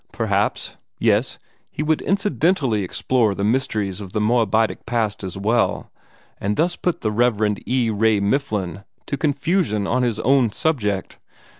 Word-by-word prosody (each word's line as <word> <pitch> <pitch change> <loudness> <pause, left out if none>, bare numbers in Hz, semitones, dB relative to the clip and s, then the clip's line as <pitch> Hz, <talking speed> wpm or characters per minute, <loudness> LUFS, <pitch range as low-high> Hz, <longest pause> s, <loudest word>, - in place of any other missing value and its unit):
Perhaps - - -1 0.2
yes, - - +1 0.3
he 150 - -4
would 155 0 +1
incidentally 180 - +1
explore 115 +2 0
the 100 - -3
mysteries 105 -4 0
of 95 -2 -9
the - - 0
Moabitic 110 0 +1
past 110 -4 -1
as 95 -1 -5
well, 110 +4 0 0.5
and 105 +1 -1
thus 175 +2 +1
put 180 - -2
the 110 - 0
Rev. 105 -2 +1
E. 125 -3 +1
Ray 110 0 +2
Mifflin 100 - -1 0.2
to - - -2
confusion 145 - 0
on 130 - +1
his 120 -4 0
own 130 -3 +3
subject. 105 - -1
115 Hz, 145 wpm, -21 LUFS, 105-135 Hz, 0.5 s, own